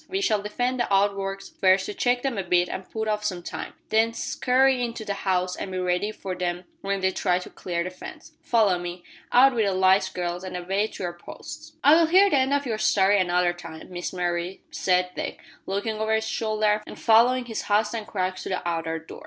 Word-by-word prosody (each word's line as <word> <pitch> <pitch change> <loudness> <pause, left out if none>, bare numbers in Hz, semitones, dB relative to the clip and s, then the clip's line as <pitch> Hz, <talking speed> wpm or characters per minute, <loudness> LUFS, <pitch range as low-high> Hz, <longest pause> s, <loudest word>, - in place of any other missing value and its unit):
We 385 - -1
shall 220 - +1
defend 245 +5 -2
the 240 - -1
outworks 195 0 0
first 190 0 +2
to 210 - -5
check 245 +3 +1
them 270 -3 -1
a 195 - -2
bit 175 0 +2
and 190 - -6
put 220 -1 -3
off 210 -1 -1
some 185 -4 -3
time, - - -6 0.2
then 225 +1 +3
scurry 255 +1 +2
into 230 -2 -4
the 200 - -1
house 185 -2 -1
and 190 - -6
be 185 - -3
ready 180 +3 0
for 190 -3 -6
them 180 0 -3 0.2
when 195 0 -2
they 190 0 +2
try 180 -1 +1
to 180 - -7
clear 170 -2 -3
the 180 - -5
fence. 185 - -11
Follow 210 -6 +2
me. 175 0 -6 0.3
Out 265 +2 +7
wi' 235 - +1
the 195 -2 0
lights, 190 +1 +4
girls, 175 0 -4
and 185 -1 -5
away 195 +4 0
to 195 - -8
your 175 -1 -3
posts." 310 - -10
"I'll 320 +3 +6
hear 380 +4 +5
the - - +4
end 260 +1 +1
of 285 0 +1
your 225 -4 -2
story 200 -1 +3
another 175 -1 +2
time, 165 -1 -11
Miss 175 0 -4
Mary," 175 0 -2
said 180 -1 +1
Dick, - - -4 0.3
looking 205 +3 -2
over 220 0 +1
his 220 0 -1
shoulder 215 -1 0
and - - -9
following 245 +3 +4
his 225 -2 -4
host 210 +1 +2
and 220 -2 -4
Crux 185 -2 -2
to - - -6
the 185 -2 -3
outer 165 -1 -2
door. 160 0 -11
195 Hz, 225 wpm, -25 LUFS, 180-225 Hz, 0.3 s, Out